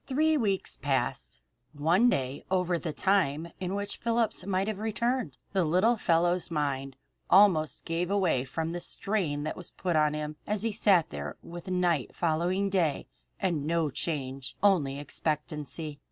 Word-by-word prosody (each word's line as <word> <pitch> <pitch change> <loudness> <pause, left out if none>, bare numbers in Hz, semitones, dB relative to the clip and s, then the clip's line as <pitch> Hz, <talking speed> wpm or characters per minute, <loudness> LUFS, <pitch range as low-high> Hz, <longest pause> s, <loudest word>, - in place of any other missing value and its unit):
Three 310 +4 +2
weeks 195 - 0
passed - - -1 0.3
one 170 +11 +3
day 135 - -1
over 180 -2 +1
the 160 - -3
time 170 -3 +1
in 185 +1 -2
which 200 0 -3
Phillips 230 -1 0
might 190 0 0
have 215 -2 -3
returned. 225 - -1 0.2
The 190 -2 +3
little 185 +9 +3
fellow's 175 -3 +1
mind 135 -4 -2 0.3
almost 180 -7 +4
gave 170 +2 -1
way 185 -10 +2
from 160 +5 -3
the 175 0 -4
strain 170 -10 -2
that 155 - -3
was 180 - -6
put 180 -3 -2
on 150 -1 +3
him 150 0 -4
as 210 0 0
he 225 - 0
sat 195 -5 +3
there 75 0 -5
with 170 +1 -9
night 180 -6 0
following 175 +4 +1
day, 175 -7 0 0.3
and 165 -7 -1
no 165 -2 +1
change 135 -3 -4
only 155 -9 +3
expectancy. 150 0 -3
170 Hz, 155 wpm, -29 LUFS, 150-195 Hz, 0.3 s, almost